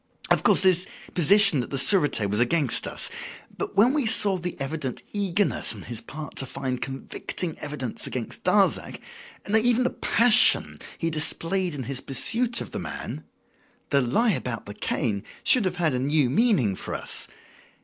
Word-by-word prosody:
"Of - - +4
course, - - +3
his 185 -1 +3 0.3
position 185 -2 +4
at - - -7
the 140 - -3
Surete 145 - +4
was 105 +2 -1
against 130 +2 +1
us; - - +2 0.4
but - - -6
when 235 +6 +4
we 290 -6 0
saw 205 -3 +2
the 180 -2 -6
evident 135 -2 -4
eagerness 200 -1 0
on - - -10
his 120 -2 -5
part 150 +6 -9
to 135 - -1
find 130 -1 -5
convicting 135 +5 -5
evidence 145 -5 -4
against 125 -3 -6
Darzac, 195 +2 +1 0.5
nay, 215 +2 +4
even 245 +2 +2
the 250 - 0
passion 235 -1 +3 0.2
he 165 -1 -2
displayed 165 +3 +1
in 135 - -5
his 130 +1 -4
pursuit 235 - 0
of - - -8
the - - -5
man, - - -7 0.7
the 140 -1 +3
lie 215 - +1
about 125 - -4
the 100 - -8
cane 100 -1 -2 0.2
should 250 -6 +4
have 180 -1 -2
had 165 -5 0
a 125 - -1
new 140 -1 +1
meaning 145 - +2
for - - -5
us. - - -2
160 Hz, 170 wpm, -24 LUFS, 130-200 Hz, 0.7 s, Of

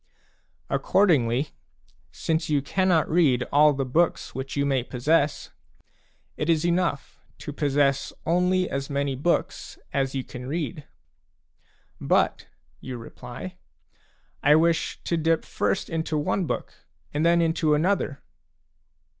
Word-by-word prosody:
Accordingly, 145 - +2 0.6
since 160 0 -2
you 145 -2 +1
cannot 180 +1 +2
read 145 -7 +3
all 150 +1 +6
the 135 -1 -2
books 165 +7 0
which 135 +2 -5
you 140 - +2
may 135 -2 +1
possess, 145 +5 0 0.9
it 150 - -2
is 165 -1 +2
enough 170 -5 -1 0.2
to 145 - -7
possess 140 -1 +1
only 180 +2 +2
P - - -6
as 135 0 -3
many 140 -1 -1
books 160 +7 -1 0.2
as 135 -1 0
you 130 - -1
can 125 0 -9
read. 155 0 -4 0.6
" - - -38 0.2
But," - - 0 0.3
you 130 -1 -6
reply, 125 +9 -9 0.4
' - - -38
"1 150 +2 +6
wish 165 0 +1
to 170 - -1
dip 165 0 +1
first 195 - -1
into 160 -1 -2
one 165 +4 0
book - - -3 0.4
and 150 +2 0
then 170 +1 +4
into 160 -2 +2
another." 160 -3 0
150 Hz, 135 wpm, -25 LUFS, 135-170 Hz, 0.9 s, all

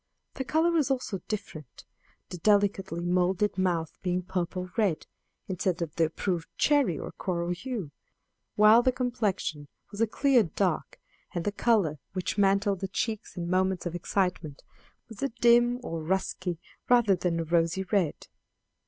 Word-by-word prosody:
The 265 - -4
color 320 +6 +2
was 315 -5 +2
also 250 -8 -2
different, 155 - -7 0.4
the 180 - -7
delicately 195 -3 +2
molded 180 +3 +1
mouth 175 -4 -1
being 180 0 -1
purple 180 0 -3
red 200 -8 +1 0.4
instead 185 -1 -1
of 160 -2 -6
the 165 - +3
approved 170 +1 -2
cherry 285 - +3
or - - -6
coral 175 -2 -2
hue; 190 - -4 0.6
while 215 +2 +7
the 255 - +3
complexion 210 - -2 0.2
was 205 +1 -5
a 230 - +4
clear 270 +2 +3
dark, 180 -1 -2 0.4
and 175 - -2
the 205 - +1
color, 200 -9 +1
which 185 -2 -2
mantled 200 -1 +2
the 195 - -3
cheeks 215 +1 -3
in 170 -1 -3
moments 185 0 +1
of 175 - -3
excitement, 175 -4 -2 0.4
was 225 -3 -11
a 275 - 0
dim 240 +1 +5
or 165 -5 -4
dusky 185 -1 -1 0.3
rather 240 -5 +5
than 175 -1 -1
a - - 0
rosy 170 +3 +1
red. 190 -5 -1
190 Hz, 155 wpm, -28 LUFS, 175-215 Hz, 0.6 s, while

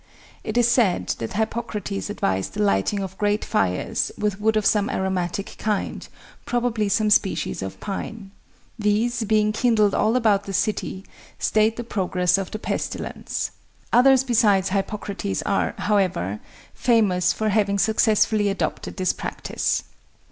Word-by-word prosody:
It 215 +1 -3
is 240 -1 +5
said 235 -7 +2
that 115 - -4
Hippocrates 210 -2 -3
advised 95 - -2
the 210 - 0
lighting 200 - +1
of 190 -1 -7
great 205 0 +1
fires 90 -1 0
with 210 -1 -2
wood 220 0 +2
of 215 - 0
some 210 +1 +3
aromatic 190 -2 -2
kind, 210 -2 -2 0.4
probably 235 -4 0
some 215 +1 +2
species 190 - +1
of 95 0 -6
pine. 200 0 -6 0.5
These, 220 +3 +1
being 215 0 +2
kindled 215 -3 +2
all 220 +3 +2
about 210 -5 +2
the 195 - -5
city, 195 0 -2 0.3
stayed 215 +1 +2
the 240 - -3
progress 185 -4 +1
of 195 - -4
the - - -5
pestilence. - - -4 0.4
Others 265 +1 +6
besides 215 -7 +3
Hippocrates 200 0 -2
are, 200 - 0
however, 180 - 0 0.3
famous 190 -7 +2
for 215 +3 -1
having 200 -1 +2
successfully 215 0 +3
adopted 195 - -3
this 185 -1 +1
practice. - - -2
210 Hz, 140 wpm, -23 LUFS, 195-220 Hz, 0.5 s, Others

